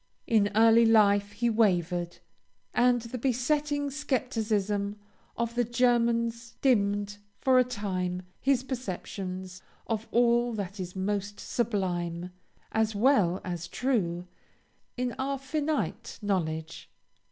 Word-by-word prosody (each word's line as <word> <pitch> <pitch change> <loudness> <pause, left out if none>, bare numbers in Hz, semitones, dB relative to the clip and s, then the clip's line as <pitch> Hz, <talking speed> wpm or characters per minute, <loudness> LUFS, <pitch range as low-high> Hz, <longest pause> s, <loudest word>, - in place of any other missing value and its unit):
In 210 -3 +3
early 225 +1 +6
life, 205 -2 +4
he 235 +4 0
wavered; 180 -6 +1 0.6
and 245 0 +3
the 240 +2 -6
besetting 285 +3 0
scepticism 215 -7 -1 0.4
of 235 0 -1
the 245 +1 +2
Germans 235 -1 +1
dimmed, 205 -5 +2 0.2
for 260 -1 +4
a - - +6
time, 185 -6 -3 0.2
his 270 -2 +2
perceptions 190 -6 -5 0.2
of 225 0 -3
all 240 0 +3
that 200 -1 -5
is 180 0 -5
most 200 +1 -2
sublime, 180 -6 -2 0.4
as 220 -1 +1
well 200 -6 +3
as 175 -2 -4
true, 180 -10 -1 0.7
in 250 -1 -1
our 275 +1 -1
finite 295 +3 -2
knowledge. 160 -5 -2
220 Hz, 110 wpm, -28 LUFS, 190-245 Hz, 0.7 s, early